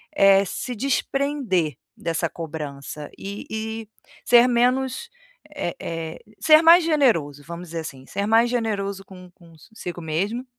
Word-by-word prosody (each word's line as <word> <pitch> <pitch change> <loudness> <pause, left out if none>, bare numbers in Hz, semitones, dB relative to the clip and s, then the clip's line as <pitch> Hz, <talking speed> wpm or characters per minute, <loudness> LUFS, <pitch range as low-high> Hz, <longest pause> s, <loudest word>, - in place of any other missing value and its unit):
eh, 195 -4 +6
se 245 +6 -5
desprender 270 - 0 0.2
dessa 165 0 -1
cobrança, 150 -3 -7
e 200 +1 -7
e 220 0 -4 0.4
ser 240 0 +6
menos 255 - +1 0.5
eh 175 -12 -3
eh, 165 -1 -5 0.2
ser 310 0 +7
mais 335 +2 +8
generoso, 195 - +2
vamos 170 +2 -8
dizer 165 0 -4
assim, 135 -4 -9
ser 200 - -2
mais 225 +2 +4
generoso 200 -5 -2
con 185 -1 -13
consigo 175 +2 -10
mesmo, 195 +10 -2
200 Hz, 130 wpm, -23 LUFS, 165-245 Hz, 0.5 s, mais